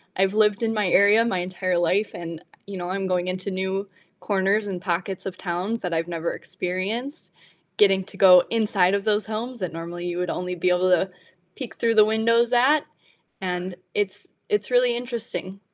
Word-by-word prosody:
I've 190 +1 +2
lived 210 0 +2
in 225 0 +1
my 210 -3 0
area 205 +4 +5
my 190 -6 0
entire 185 0 -1
life 185 +5 +1
and, 165 -2 -6
eh, - - -23 0.2
you 200 -1 -7
know, 175 0 -4
I'm 195 0 -2
going 180 -1 0
into 185 +2 -3
new 190 +1 -2 0.3
corners 200 +1 +1
and 180 -2 -4
pockets 185 +1 -3
of 190 -1 -5
towns 190 +6 -3
that 180 -2 -3
I've 165 0 -1
never 170 -1 -3
experienced. 215 - -4 0.5
Getting 195 -2 +4
to 195 - -13
go 180 -2 +8
inside 205 -5 +2
of 200 - -2
those 210 -1 +1
homes 230 +3 -4
that 185 -3 -3
normally 170 +1 -6
you 175 0 -3
would 180 -1 -1
only 180 0 -3
be 180 +1 +1
able 180 +1 +2
to 185 +1 +3 0.5
peek 255 -4 -7
through 230 -1 +1
the 215 - +7
windows 230 +2 +2
at, 270 +5 +4 0.6
and 180 0 -3 0.2
it's 205 - -2 0.2
it's 420 - 0
really 245 -1 +4
interesting. 230 -5 -6
195 Hz, 190 wpm, -24 LUFS, 180-220 Hz, 0.6 s, go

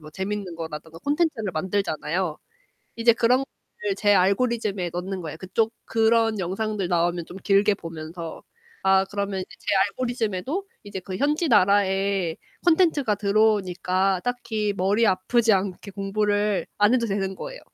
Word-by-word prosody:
뭐 155 0 -12
재밌는 190 +1 -4
거라던가 160 0 -7
콘텐츠를 285 - 0
만들잖아요. 175 -1 -1 0.6
이제 230 0 +4
그런 240 +3 +3
것들을 400 +8 -6
제 205 -1 +3
알고리즘에 200 -1 +1
넣는 185 +1 -4
거예요. 160 -2 -6
그쪽 220 +6 -1
그런 225 -1 +2
영상들 195 +2 -2
나오면 175 -1 0
좀 185 - -10
길게 200 0 +4
보면서 165 0 -8 0.4
아 190 0 +4
그러면 200 -1 -3
이제 - - -10
제 - - -21 0.2
알고리즘에도 245 - -2 0.2
이제 205 -1 -6
그 185 0 -6
현지 300 - +1
나라의 195 -4 +3 0.3
컨텐츠가 320 - +3
들어오니까 195 -3 +1
딱히 220 -4 -2
머리 200 +5 +2
아프지 220 +4 +2
않게 195 +1 -2
공부를 205 +1 0
안 205 +3 +4
해도 245 -2 +2
되는 195 -2 -2
거예요. - - -7
200 Hz, 340 characters per minute, -24 LUFS, 185-225 Hz, 0.6 s, 이제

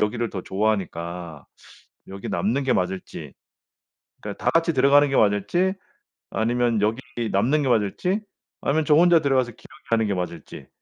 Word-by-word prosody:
여기를 115 +2 0
더 95 - -5
좋아하니까 90 -6 -3 0.6
여기 95 0 -7
남는 125 +7 0
게 135 - +1
맞을지. 95 -1 -3 0.9
그러니까 - - -7
다 - - +3
같이 165 0 +2
들어가는 140 +2 +5
게 135 - -1
맞을지 105 - +2 0.6
아니면 120 -1 0
여기 110 +3 +1 0.3
남는 130 +10 +2
게 135 - 0
맞을지 120 - 0 0.4
아니면 155 +2 0
저 150 - +4
혼자 175 +1 +6
들어가서 130 -5 +1
기러기 - - -18
하는 110 -2 +2
게 100 - 0
맞을지. 90 -3 -6
115 Hz, 345 characters per minute, -23 LUFS, 100-140 Hz, 0.9 s, 혼자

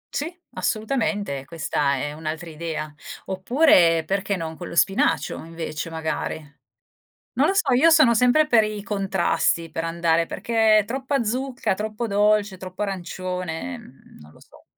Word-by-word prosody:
Sì, 305 +4 -2 0.2
assolutamente, 215 - -1
questa 145 -2 -1
è 145 +2 -3
un'altra 160 +2 -5
idea. 155 -1 -5 0.3
Oppure 190 - +4
perché 195 +3 -1
non 160 -2 -5
con 175 +1 -8
lo - - -8
spinacio 195 +3 +1
invece, 165 -1 -5
magari. 160 -1 -3 1.0
Non - - +3
lo - - +2
so, 275 -9 +2
io 290 +7 +5
sono 310 -7 +6
sempre 250 +7 +4
per 235 -7 +4
i 215 -1 -4
contrasti, 195 -4 0
per 165 - -3
andare, 165 0 +1
perché 220 0 +2
troppa 265 +1 -1
zucca, 255 0 -1
troppo 215 +3 -4
dolce, 205 -1 +2
troppo 185 +2 -6
arancione, 185 +3 -4
mhmm, 135 - -17
non 75 - -15
lo - - -20
so. - - -20
195 Hz, 145 wpm, -23 LUFS, 165-225 Hz, 1.0 s, sono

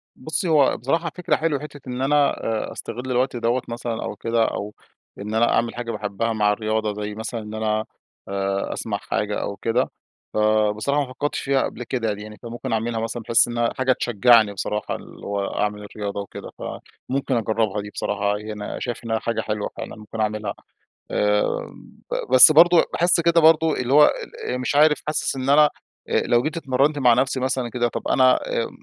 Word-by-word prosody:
بُصّي، 160 +7 -3
هو 145 -4 +4
بصراحة 165 +6 -1
فكرة 180 - 0
حلوة، 155 -3 0
حتّة 145 -1 -10
إن 125 0 -4
أنا 145 +1 +3 0.4
أ - - -10
أستغل 125 +2 -6
الوقت 125 +1 +1
دوّة 120 +2 0
مثلًا 115 -1 -4
أو - - -5
كده. 115 +2 +1
أو 105 -1 -4 0.5
إن 105 +2 -5
أنا 115 +1 +3
أعمل 115 0 0
حاجة 120 -1 -4
باحبها 105 +1 -2
مع 105 -1 +2
الرياضة 110 0 -1
زي 105 0 -5
مثلًا 110 +1 -4
إن 105 0 -9
أنا 110 0 -1 0.4
آآ 100 0 -2
أسمع 105 -3 -3
حاجة 105 +1 -2
أو 100 - -4
كده. 115 +5 0 0.4
فبصراحة 110 +6 +2
ما 130 - -10
فكّرتش 145 +3 -2
فيها 135 -1 +1
قبل 120 - -5
كده 115 -2 -2
يعني. 105 +1 -9
فممكن 120 0 -6
أعملها 115 +1 -1
مثلًا 115 +1 -4
بحيث 115 +2 +4
إنّها 120 0 -1
حاجة 130 0 +2
تشجّعني 115 -2 +4
بصراحة 105 +2 -3
اللي - - -11
هو 100 -1 -1
أعمل 105 0 -2
الرياضة 100 -1 -5
وكده. 100 - -9
فممكن 135 0 -4
أجرّبها 110 -2 0
دي 105 - -8
بصراحة 105 0 -1
ي 105 0 -6
أنا 105 -1 -6
شايف 120 -2 -4
إن 115 -1 0
حاجة 115 0 -2
حلوة 105 -1 -3
فعلًا - - -6
ممكن 110 +1 -9
أعملها. 105 0 -2 0.6
آآ 105 0 +2 0.7
ب - - -3
بس 130 +4 +10
برضه 170 +2 +6
باحس 175 0 +3
كده 170 0 +4
برضه 160 0 +5
اللي 125 +1 -1
هو 150 +1 +8
ال - - -3
أ - - -1
مش 125 +2 -2
عارف 150 +1 +5
حاسس 155 -2 -1
إن 130 0 -3
أنا 150 +1 +6 0.4
أ - - +2
لو 120 0 +3
جيت 160 +3 -3
اتمرّنت 140 0 +1
مع 125 -3 +5
نفسي 130 +2 +1
مثلًا 130 -1 -1
كده، 120 0 0
طب - - -5
أنا 130 -1 +5
أ - - -2
115 Hz, 190 wpm, -23 LUFS, 105-135 Hz, 0.7 s, بس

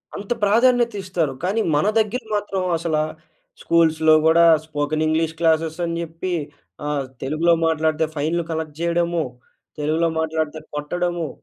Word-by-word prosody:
అంత 200 +3 -7
ప్రాధాన్యత 235 +2 +3
ఇస్తారు. 170 -7 -1
కానీ 200 +5 +1
మన 150 +8 +2
దగ్గర 220 +4 0
మాత్రం 205 -2 -2 0.2
అసలా 160 -2 0 0.6
స్కూల్స్‌లో 160 -1 +3
కూడా 170 +1 +5 0.2
స్పోకెన్ 155 0 -1
ఇంగ్లీష్ 160 +1 0
క్లాసెస్ 160 0 +1
అని 170 0 -3
జెప్పి, 170 +2 -4 0.5
ఆహ్, 145 -2 -1 0.2
తెలుగులో 160 +5 +2
మాట్లాడితే 160 0 +1
ఫైన్‌లు 160 +3 -1
కలెక్ట్ 160 -2 -4
జేయడము, 170 -1 0 0.5
తెలుగులో 160 +3 +1
మాట్లాడితే 160 -1 -2
కొట్టడము. 170 +1 -2
165 Hz, 125 wpm, -21 LUFS, 155-175 Hz, 0.6 s, కూడా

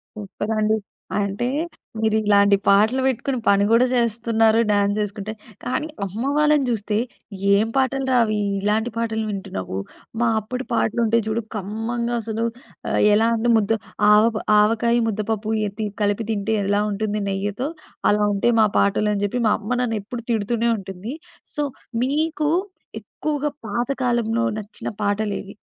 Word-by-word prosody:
Super 210 +1 -5
అండి. 215 0 +2 0.4
అంటే 200 +4 -1 0.5
మీరిలాంటి 210 -2 +4
పాటలు 215 +6 +4
వేట్టుకొని 265 0 0
పని 200 0 +5
గూడా 230 +2 +5
జేస్తున్నారు 225 -1 +2
డ్యాన్సేసుకుంటే. 205 +1 0 0.3
కానీ 255 +5 -2 0.2
అమ్మ 200 +4 -5 0.2
వాళ్ళని 300 -2 +4
జూస్తే, 210 -2 -1 0.6
"ఏం 210 +2 +2
పాటలురా 265 0 +1
అవి? 215 -1 0 0.2
ఇలాంటి 215 +3 +1
పాటలు 220 -1 -1
వింటున్నావు. 95 - -5 0.4
మా 235 - +3
అప్పుడు 250 +5 -5
పాటలు 225 0 +1
ఉంటాయి 230 +1 +2
జూడు 220 +1 0
కమ్మంగా, 225 +4 -3
అసలు 225 +1 -2 0.7
ఎలా 220 +2 +4
అంటే 235 +1 +1
ముద్ద 215 0 0 0.4
ఆవ 210 0 +7 0.4
ఆవకాయ, 225 +2 +3
ముద్దపప్పు 215 0 -2 0.2
ఎ - - -3
తి 215 - 0 0.2
కలిపి 205 +2 0
తింటే 215 +1 0
ఎలా 205 +1 +2
ఉంటుంది? 210 +1 -2
నెయ్యితో 205 +6 -2 0.4
అలా 210 0 +2
ఉంటేయి 230 +4 +2
మా 215 - +5
పాటలు" 200 +1 +2
అని 200 - -2
జెప్పి 245 +5 -2
మా 210 - +4
అమ్మ 215 +2 -6
నన్నెప్పుడు 225 0 -3
తిడుతూనే 230 +2 0
ఉంటుంది. 195 +4 -7 0.4
సో, 295 - -1 0.4
మీకు 300 +2 0 0.5
ఎక్కువగా 295 -1 -3 0.2
పాత 235 +4 -1 0.2
కాలంలో 235 -1 +1 0.2
నచ్చిన 210 0 -7 0.2
పాటలేవి? 205 -1 -2
220 Hz, 135 wpm, -22 LUFS, 205-235 Hz, 0.7 s, ఆవ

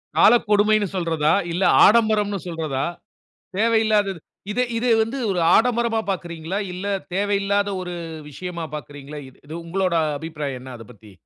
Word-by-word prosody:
காலக்கொடுமைன்னு 210 -3 +4
சொல்றதா? 165 -3 +1 0.2
இல்ல, 175 +3 -1 0.2
ஆடம்பரம்ன்னு 210 -2 +3
சொல்றதா? 155 -5 -2 0.7
தேவையில்லாதது. 215 -4 +2 0.3
இத 245 - -1 0.2
இது 240 +2 0
வந்து 230 +5 -3
ஒரு 180 -2 0 0.2
ஆடம்பரமா 235 -1 +2
பார்க்கிறீங்களா? 170 0 -4
இல்ல 185 +3 -5 0.3
தேவையில்லாத 200 0 +1
ஒரு 180 -1 -5 0.4
விஷயமா 170 +2 -6
பார்க்கிறீங்களா? 145 0 -8 0.3
இது 155 - -8
உங்களுடைய 180 0 0 0.2
அபிப்ராயம் 150 -5 -5
என்ன 130 0 -10
அதப் 115 0 -13
பத்தி? 110 -3 -16
185 Hz, 125 wpm, -22 LUFS, 160-210 Hz, 0.7 s, காலக்கொடுமைன்னு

